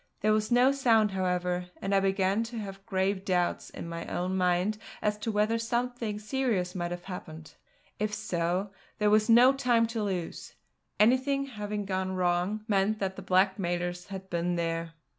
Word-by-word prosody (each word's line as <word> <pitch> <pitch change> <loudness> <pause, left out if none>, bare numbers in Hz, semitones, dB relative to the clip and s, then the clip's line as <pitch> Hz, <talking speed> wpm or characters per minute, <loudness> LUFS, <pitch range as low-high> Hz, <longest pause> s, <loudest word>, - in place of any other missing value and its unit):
There 215 +1 +3
was 215 +2 0
no 250 +2 +5
sound, 230 -6 +3
however, 180 -1 -1
and 195 +1 -2
I 195 - +5
began 195 +1 +1
to 235 +1 -7
have 195 -2 -7
grave 190 -1 0
doubts 180 -3 0
in - - -8
my 170 0 -6
own 185 +1 -2
mind 185 +3 +1 0.2
as 210 0 0
to 225 - -2
whether 215 +2 +1
something 235 -2 -2
serious 215 -5 -1
might 175 -2 -2
have 175 0 -6
happened. 160 -5 -8 0.5
If 215 0 0
so, 190 -2 -1 0.3
there 210 -1 +2
was 215 +1 +4
no 245 +3 +7
time 245 -4 +2
to 225 - -1
lose. 185 -5 -4 0.4
Anything 260 +5 +3
having 210 -5 -4
gone 190 -1 -2
wrong 180 +4 0
meant 205 0 +2
that 190 -2 -2
the 195 - -7
blackmailers 180 -2 0
had 190 -1 -7
been 175 0 -1
there. 165 -1 -2
195 Hz, 170 wpm, -29 LUFS, 180-215 Hz, 0.5 s, no